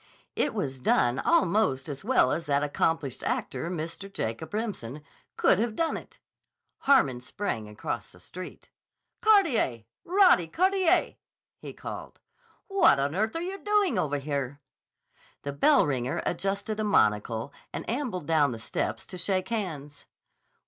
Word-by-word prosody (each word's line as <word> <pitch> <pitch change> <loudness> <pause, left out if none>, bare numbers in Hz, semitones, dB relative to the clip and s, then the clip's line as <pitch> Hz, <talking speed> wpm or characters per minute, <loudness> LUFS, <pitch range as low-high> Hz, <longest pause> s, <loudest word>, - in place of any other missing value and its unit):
It - - 0
was 135 -1 -3
done 125 0 +2
almost 215 - +2
as 145 +1 -6
well 225 - +3
as 165 0 -2
that 140 0 +2
accomplished 150 -2 -1
actor, 135 +6 -2
Mr. 170 +3 -5
Jacob 115 -2 -4
Remsen, 180 - -4 0.3
could 190 - +4
have 225 -1 -1
done 330 +4 0
it. - - -9 0.6
Harmon 140 - +3
sprang 125 - -4
across 105 - -5
the 90 - -17
street. 180 - -10 0.5
"Carteret! 330 - +3 0.2
Roddy 365 - +5
Carteret!" 375 - +2 0.4
he - - -8
called. - - -8 0.5
"What 390 - +5
on 140 +2 0
earth 215 - 0
are 330 - -1
you 385 +2 -4
doing 410 - +2
over 145 -4 0
here?" 140 -1 -3 0.8
The 140 - -4
bell 280 - +4
ringer 130 -3 -1
adjusted 200 +4 -2
a - - 0
monocle 110 - +1 0.2
and - - -6
ambled 235 - -2
down 150 -4 +3
the - - -6
steps 115 - -3
to 185 - -8
shake 185 0 -1
hands. 155 - -4
165 Hz, 140 wpm, -28 LUFS, 135-225 Hz, 0.8 s, Roddy